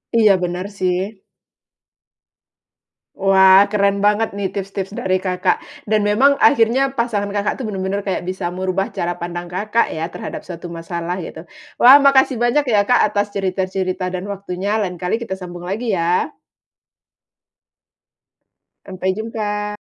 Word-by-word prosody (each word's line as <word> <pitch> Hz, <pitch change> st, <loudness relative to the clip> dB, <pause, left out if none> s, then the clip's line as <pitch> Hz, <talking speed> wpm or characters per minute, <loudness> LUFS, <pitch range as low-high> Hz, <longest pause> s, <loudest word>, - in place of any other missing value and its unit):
Iya, 215 Hz, -3 st, +6 dB
benar 180 Hz, +1 st, -3 dB
sih. 185 Hz, +3 st, -2 dB, 1.9 s
Wah, 190 Hz, 0 st, +6 dB
keren 200 Hz, -1 st, +2 dB
banget 210 Hz, +2 st, +2 dB
nih 200 Hz, -, -1 dB
tips-tips 195 Hz, 0 st, -5 dB
dari 185 Hz, 0 st, +1 dB
Kakak, 185 Hz, -1 st, 0 dB, 0.3 s
dan 215 Hz, -1 st, +2 dB
memang 265 Hz, +7 st, +4 dB
akhirnya, 265 Hz, 0 st, +3 dB
pasangan 225 Hz, -5 st, -1 dB
Kakak 205 Hz, 0 st, -1 dB
tuh 260 Hz, -, -5 dB
benar-benar 195 Hz, -1 st, -2 dB
kayak 195 Hz, -, -1 dB
bisa 185 Hz, -1 st, -4 dB
merubah 185 Hz, +1 st, -2 dB
cara 175 Hz, 0 st, -3 dB
pandang 175 Hz, 0 st, -5 dB
Kakak 210 Hz, +5 st, 0 dB
ya, 160 Hz, +1 st, -3 dB
terhadap -, -, -6 dB
suatu 175 Hz, -1 st, -8 dB
masalah, 170 Hz, +1 st, -4 dB
gitu. 160 Hz, -, -9 dB, 0.4 s
Wah, 260 Hz, +3 st, +10 dB
makasih 275 Hz, -3 st, +4 dB
banyak 240 Hz, +5 st, +2 dB
ya 205 Hz, -3 st, +3 dB
Kak 245 Hz, -, +3 dB
atas 205 Hz, 0 st, -2 dB
cerita-cerita 185 Hz, -1 st, -2 dB
dan 185 Hz, 0 st, -4 dB
waktunya, 200 Hz, +1 st, -3 dB
lain 180 Hz, -3 st, -3 dB
kali 180 Hz, +5 st, 0 dB
kita 235 Hz, -4 st, -5 dB
sambung 175 Hz, -1 st, -8 dB
lagi 205 Hz, +2 st, -2 dB
ya. 170 Hz, +1 st, +1 dB, 2.6 s
Sampai 190 Hz, 0 st, -2 dB
jumpa. 210 Hz, -1 st, -3 dB
195 Hz, 135 wpm, -19 LUFS, 185-215 Hz, 2.6 s, Wah